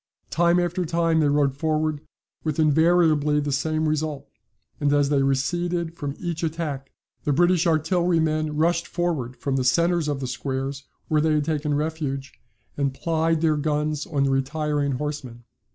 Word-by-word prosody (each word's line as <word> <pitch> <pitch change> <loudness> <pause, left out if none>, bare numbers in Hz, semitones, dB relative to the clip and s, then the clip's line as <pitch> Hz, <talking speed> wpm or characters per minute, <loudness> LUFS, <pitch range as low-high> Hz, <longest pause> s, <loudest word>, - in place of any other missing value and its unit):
Time 170 +1 +3
after 175 +1 0
time 165 -1 +1
they 150 - +3
rode 140 -2 +2
forward 155 0 -1 0.4
with 155 -1 -2
invariably 155 -1 +3
the 145 0 -2
same 155 +3 0
result: 155 -2 -2 0.5
and 145 -1 +1
as 145 -1 +3
they 145 -2 +2
receded 170 +5 0
from 145 -3 -4
each 170 -3 -4
attack 155 -4 -3 0.3
the 145 - 0
British 175 +3 +3
artillerymen 160 -2 +1
rushed 170 +2 +1
forward 155 -8 -2
from 135 -1 -1
the 130 - 0
centres 170 +4 +2
of 145 -2 -1
the 135 - -3
squares, 135 +2 -4 0.2
where 155 -1 +2
they 155 0 +2
had 150 -1 +1
taken 150 -2 -1
refuge, 145 -3 -3 0.4
and 140 -2 -1
plied 165 +1 0
their 155 -2 +2
guns 150 0 -1
on 145 -4 0
the 135 - +2
retiring 145 +1 0
horsemen. 130 -4 -5
155 Hz, 160 wpm, -24 LUFS, 140-165 Hz, 0.5 s, Time